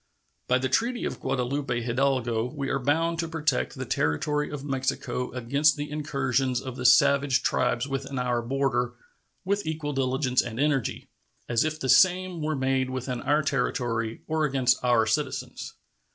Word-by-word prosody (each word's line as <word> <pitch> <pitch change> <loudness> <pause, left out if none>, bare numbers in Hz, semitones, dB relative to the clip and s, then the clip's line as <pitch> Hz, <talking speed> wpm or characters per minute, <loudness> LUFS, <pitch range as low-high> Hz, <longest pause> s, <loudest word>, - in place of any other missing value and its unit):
By 125 - +3
the 130 +1 -1
treaty 235 - 0
of - - -4
Guadalupe 130 -1 -1
Hidalgo 120 -2 0
we 135 +1 -4
are 135 - 0
bound 165 +5 +1
to 165 - -1
protect 155 - -1
the - - -5
territory 150 - 0
of 145 -1 -6
Mexico 130 -2 -2
against 140 +5 +2
the 145 0 -5
incursions 135 -4 0
of 130 -1 -7
the 125 -1 +2
savage 140 +1 +4
tribes 120 +3 +1
within 135 0 -4
our 125 -1 0
border 125 -1 -1 0.5
"with 200 +2 0
equal 155 -2 -3
diligence 130 -1 +1
and 115 -1 -6
energy" 140 -4 0 0.4
as 120 -1 +2
if 155 0 -2
the 135 - -3
same 185 +2 +4
were 155 0 -1
made 130 -1 0
within 130 -1 -4
our 150 +3 +2
territory 120 -5 -1
or 160 0 0
against 130 -4 +2
our 120 -3 +3
citizens. 110 - -3
135 Hz, 160 wpm, -26 LUFS, 125-150 Hz, 0.5 s, savage